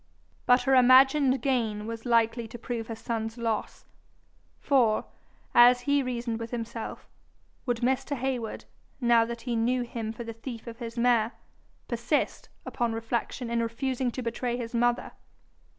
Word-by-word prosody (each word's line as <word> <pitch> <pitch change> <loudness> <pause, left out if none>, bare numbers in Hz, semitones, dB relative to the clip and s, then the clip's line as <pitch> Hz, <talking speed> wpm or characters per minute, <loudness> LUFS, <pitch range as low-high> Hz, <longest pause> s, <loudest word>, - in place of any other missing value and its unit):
But 250 +1 +5
her 270 - +2
imagined 260 +1 +5
gain 225 -6 0
was 230 +1 -6
likely 230 0 +2
to 230 - -9
prove 230 -1 -5
her 225 - -5
son's 225 0 -4
loss; 225 -3 -3 0.7
for, 240 -6 +2 0.5
as 245 +1 +7
he 285 +2 +2
reasoned 240 -3 -3
with 230 0 -5
himself, 230 -1 -6 0.6
would 240 -1 0
Mr. 265 +3 0
Heywood, 250 -3 -3 0.3
now 235 -2 +4
that 235 0 -6
he 240 -1 -2
knew 245 +2 +1
him 230 -2 -5
for 230 +1 -7
the 230 0 -6
thief 230 0 -8
of 230 0 -9
his 235 -1 -7
mare, 235 -1 +3 0.5
persist, 235 +5 -1 0.2
upon 235 -2 -1
reflection, 230 +1 -3
in 235 0 +1
refusing 250 +2 -1
to 255 - -4
betray 240 +1 -2
his 235 -1 -6
mother? 240 +1 +1
235 Hz, 150 wpm, -28 LUFS, 230-250 Hz, 0.7 s, as